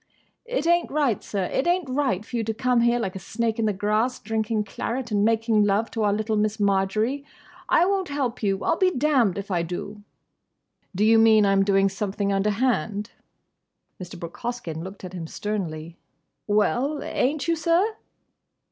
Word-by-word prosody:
"It 485 Hz, -10 st, -2 dB
ain't 345 Hz, 0 st, +3 dB
right, 280 Hz, -7 st, +1 dB
sir. 200 Hz, -2 st, -2 dB
It 265 Hz, -, -1 dB
ain't 355 Hz, -2 st, +1 dB
right 255 Hz, -7 st, -1 dB
for 245 Hz, -, -7 dB
you 230 Hz, -, 0 dB
to 220 Hz, 0 st, -2 dB
come 250 Hz, +1 st, +2 dB
here 235 Hz, +1 st, +3 dB
like 195 Hz, -6 st, -3 dB
a -, -, -4 dB
snake 225 Hz, +4 st, -2 dB
in 225 Hz, -, +1 dB
the -, -, +2 dB
grass 215 Hz, +5 st, 0 dB
drinking 220 Hz, 0 st, -1 dB
claret 235 Hz, +4 st, -4 dB
and 205 Hz, -1 st, +2 dB
making 225 Hz, -1 st, +3 dB
love 205 Hz, +2 st, +1 dB
to 225 Hz, -, -3 dB
our 205 Hz, -1 st, +3 dB
little 215 Hz, +1 st, -1 dB
Miss 215 Hz, +1 st, 0 dB
Marjory. 205 Hz, +7 st, +1 dB, 0.5 s
I 340 Hz, -, +5 dB
won't 390 Hz, -1 st, 0 dB
help 270 Hz, -4 st, -2 dB
you! 195 Hz, -2 st, 0 dB
I'll 330 Hz, -, +1 dB
be 375 Hz, -, +4 dB
damned 260 Hz, -, +2 dB
if 200 Hz, 0 st, -5 dB
I 175 Hz, -2 st, +1 dB
do!" 180 Hz, +5 st, -6 dB, 0.9 s
"Do 205 Hz, +3 st, +2 dB
you 225 Hz, +1 st, +6 dB
mean 220 Hz, -2 st, +6 dB
I'm 195 Hz, 0 st, +3 dB
doing 195 Hz, 0 st, +3 dB
something 200 Hz, +1 st, -2 dB
underhand?" 210 Hz, 0 st, 0 dB, 0.9 s
Mr. 180 Hz, 0 st, -8 dB
Brooke 170 Hz, 0 st, -8 dB
Hoskyn 235 Hz, -10 st, -4 dB
looked 190 Hz, +2 st, -9 dB
at 185 Hz, 0 st, -7 dB
him 170 Hz, -3 st, -6 dB
sternly. 170 Hz, -5 st, -4 dB, 0.5 s
"Well—ain't 275 Hz, +7 st, 0 dB
you, 335 Hz, -, +2 dB
sir?" 340 Hz, +7 st, +1 dB
215 Hz, 175 wpm, -24 LUFS, 200-255 Hz, 0.9 s, you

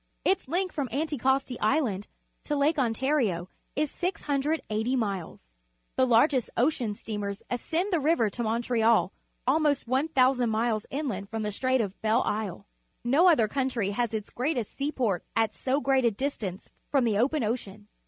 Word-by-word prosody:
Its 380 Hz, -, +1 dB
length 360 Hz, +5 st, -1 dB
from 280 Hz, -5 st, -2 dB
Anticosti 270 Hz, -2 st, 0 dB
Island 215 Hz, -6 st, +1 dB, 0.4 s
to 295 Hz, -, -1 dB
Lake 295 Hz, +2 st, +2 dB
Ontario 230 Hz, -, +1 dB, 0.3 s
is 300 Hz, 0 st, 0 dB
680 280 Hz, -, -1 dB
miles. 195 Hz, -, -3 dB, 0.4 s
The 260 Hz, -, +3 dB
largest 250 Hz, +1 st, +3 dB
ocean 240 Hz, -5 st, +1 dB
sten.mers 205 Hz, -2 st, -5 dB
ascend 330 Hz, -, -1 dB
the 340 Hz, -, +3 dB
river 290 Hz, -6 st, +3 dB
to 240 Hz, -, -5 dB
Montreal, 230 Hz, -2 st, +2 dB, 0.3 s
almost 290 Hz, 0 st, +2 dB
1,000 260 Hz, -2 st, +2 dB
miles, 220 Hz, -1 st, 0 dB
inland 235 Hz, -9 st, -3 dB
from 220 Hz, 0 st, -3 dB
th 210 Hz, -1 st, -2 dB
e -, -, -7 dB
Strait 260 Hz, +1 st, +2 dB
of 200 Hz, -3 st, -5 dB
Belle 220 Hz, +3 st, +2 dB
Isle 205 Hz, -3 st, -3 dB, 0.4 s
No 280 Hz, +9 st, +4 dB
other 245 Hz, -11 st, +5 dB
countrv 250 Hz, -4 st, -1 dB
has 235 Hz, +2 st, -1 dB
its 210 Hz, -2 st, -4 dB
g -, -, -27 dB
reatest 250 Hz, -3 st, -1 dB
seaport 255 Hz, -, -1 dB
at 225 Hz, -1 st, +2 dB
so 265 Hz, +2 st, 0 dB
great 270 Hz, -2 st, +2 dB
a 235 Hz, -, +5 dB
distance 215 Hz, -5 st, -4 dB, 0.2 s
from 275 Hz, -3 st, +3 dB
the 210 Hz, -3 st, +1 dB
open 275 Hz, +3 st, +2 dB
ocean. 210 Hz, -3 st, -4 dB
245 Hz, 160 wpm, -28 LUFS, 215-280 Hz, 0.4 s, other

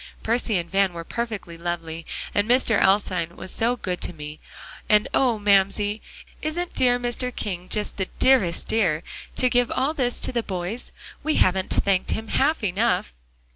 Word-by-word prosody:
"Percy 230 Hz, -2 st, +1 dB
and 170 Hz, -1 st, -3 dB
Van 195 Hz, 0 st, +1 dB
were 170 Hz, -1 st, -6 dB
perfectly 215 Hz, -5 st, -5 dB
lovely, 165 Hz, -1 st, -4 dB, 0.3 s
and 205 Hz, +2 st, +1 dB
Mr. 245 Hz, -3 st, +4 dB
Alstyne 185 Hz, -4 st, +2 dB
was 185 Hz, -, -5 dB
so 235 Hz, +2 st, +1 dB
good 180 Hz, -7 st, -4 dB
to -, -, -1 dB
me. 150 Hz, -1 st, -8 dB, 0.5 s
And 210 Hz, 0 st, +4 dB
oh! 245 Hz, -4 st, +3 dB
Mamsie, 205 Hz, +1 st, +2 dB, 0.4 s
isn't 340 Hz, +3 st, -3 dB
dear 245 Hz, -1 st, +3 dB
Mr. 245 Hz, +1 st, -1 dB
King 180 Hz, -3 st, -4 dB
just 210 Hz, -1 st, -1 dB
the 190 Hz, -2 st, -2 dB
dearest 225 Hz, -11 st, +3 dB
dear, 180 Hz, -8 st, +2 dB, 0.3 s
to 255 Hz, -, +3 dB
give 245 Hz, -1 st, +2 dB
all 270 Hz, +4 st, 0 dB
this 250 Hz, -5 st, 0 dB
to -, -, +3 dB
the 240 Hz, -2 st, 0 dB
boys? 190 Hz, +3 st, -5 dB, 0.3 s
We 310 Hz, 0 st, 0 dB
haven't 185 Hz, 0 st, +2 dB
thanked 195 Hz, -2 st, +2 dB
him 220 Hz, 0 st, -3 dB
half 285 Hz, -1 st, +1 dB
enough." 200 Hz, -, 0 dB
205 Hz, 170 wpm, -24 LUFS, 180-245 Hz, 0.5 s, Mr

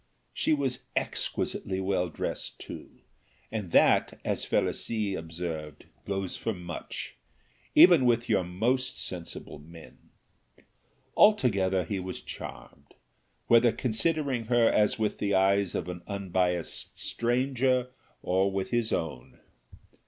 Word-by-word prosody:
She -, -, 0 dB
was 135 Hz, -4 st, 0 dB
exquisitely 95 Hz, -1 st, -2 dB
well 95 Hz, -2 st, 0 dB
dressed -, -, -5 dB
too, -, -, -9 dB, 0.6 s
and 105 Hz, -5 st, -4 dB
that, -, -, +4 dB
as -, -, -1 dB
Felicie 110 Hz, -4 st, 0 dB
observed, 80 Hz, -3 st, -6 dB, 0.2 s
goes 95 Hz, -2 st, -2 dB
for 115 Hz, -, -3 dB
much, 90 Hz, -1 st, -7 dB, 0.6 s
even 170 Hz, -8 st, +8 dB
with 120 Hz, -1 st, +2 dB
your 100 Hz, -4 st, +2 dB
most 120 Hz, +9 st, -1 dB
sensible 85 Hz, -4 st, -7 dB
men. 80 Hz, +2 st, -15 dB, 1.1 s
Altogether 100 Hz, -, +4 dB
he 95 Hz, +4 st, -3 dB
was 95 Hz, 0 st, -5 dB
charmed, 70 Hz, -, -10 dB, 0.5 s
whether 115 Hz, 0 st, +5 dB
considering 130 Hz, +2 st, -1 dB
her 120 Hz, 0 st, +4 dB
as 105 Hz, 0 st, +3 dB
with 110 Hz, -1 st, -1 dB
the 100 Hz, -1 st, +1 dB
eyes 95 Hz, 0 st, +3 dB
of -, -, -2 dB
an 90 Hz, -1 st, -6 dB
unbiased 90 Hz, -3 st, -1 dB
stranger 125 Hz, +1 st, +1 dB, 0.3 s
or 95 Hz, +2 st, +2 dB
with 95 Hz, -1 st, -3 dB
his 120 Hz, -2 st, 0 dB
own. 70 Hz, -7 st, -4 dB
100 Hz, 115 wpm, -28 LUFS, 90-120 Hz, 1.1 s, even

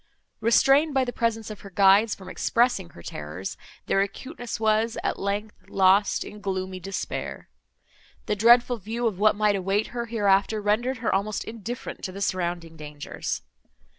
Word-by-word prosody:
Restrained 275 Hz, +6 st, +4 dB
by 265 Hz, -1 st, +3 dB
the 245 Hz, -, -4 dB
presence 225 Hz, -2 st, -1 dB
of 210 Hz, -, -8 dB
her 200 Hz, -, -10 dB
guides 200 Hz, +3 st, +5 dB
from 190 Hz, -, -13 dB
expressing 230 Hz, -2 st, +1 dB
her 85 Hz, -, -14 dB
terrors, 75 Hz, +6 st, -6 dB, 0.3 s
their 195 Hz, -, +2 dB
acuteness 240 Hz, +4 st, -5 dB
was, 220 Hz, +1 st, +1 dB
at -, -, -1 dB
length, 205 Hz, +2 st, -4 dB
lost 195 Hz, +1 st, +3 dB
in 210 Hz, -, -10 dB
gloomy 190 Hz, -1 st, -3 dB
despair. 195 Hz, +2 st, -5 dB, 0.8 s
The 210 Hz, -, 0 dB
dreadful 240 Hz, +3 st, +5 dB
view 225 Hz, +4 st, -4 dB
of 210 Hz, -5 st, -1 dB
what 210 Hz, 0 st, +4 dB
might 210 Hz, -1 st, +2 dB
await 195 Hz, +2 st, 0 dB
her 235 Hz, -1 st, -3 dB
hereafter 205 Hz, -1 st, +2 dB
rendered 225 Hz, +5 st, 0 dB
her -, -, +2 dB
almost 200 Hz, +2 st, -1 dB
indifferent 230 Hz, +3 st, -7 dB
to 185 Hz, -, -4 dB
the 195 Hz, -, -8 dB
surrounding 175 Hz, -3 st, -2 dB
dangers. 150 Hz, -1 st, -5 dB
205 Hz, 160 wpm, -25 LUFS, 190-230 Hz, 0.8 s, guides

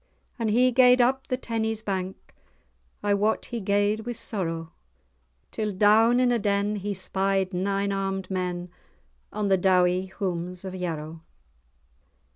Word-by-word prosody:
As 225 Hz, -2 st, 0 dB
he 250 Hz, +4 st, +4 dB
gaed 250 Hz, 0 st, +6 dB
up 265 Hz, +2 st, +2 dB
the 255 Hz, -, -1 dB
Tennies 225 Hz, -3 st, -3 dB
bank 190 Hz, -1 st, -4 dB, 0.7 s
I 205 Hz, -, +2 dB
wot 210 Hz, +2 st, +1 dB
he 235 Hz, -, -5 dB
gaed 205 Hz, +2 st, +1 dB
with 235 Hz, +1 st, -5 dB
sorrow, 165 Hz, -6 st, -4 dB, 0.8 s
Till 215 Hz, -1 st, -2 dB
down 220 Hz, +5 st, +4 dB
in 250 Hz, -1 st, +3 dB
a 240 Hz, -, +2 dB
den 205 Hz, 0 st, 0 dB
he 205 Hz, +1 st, -3 dB
spied 190 Hz, 0 st, 0 dB
nine 200 Hz, +2 st, 0 dB
armed 195 Hz, -1 st, -3 dB
men, 180 Hz, -1 st, -3 dB, 0.6 s
On 210 Hz, -1 st, -2 dB
the 190 Hz, -1 st, +3 dB
dowie 185 Hz, 0 st, +3 dB
houms 180 Hz, -1 st, -4 dB
of 190 Hz, -, -5 dB
Yarrow. 165 Hz, -3 st, -5 dB
200 Hz, 140 wpm, -26 LUFS, 185-220 Hz, 0.8 s, gaed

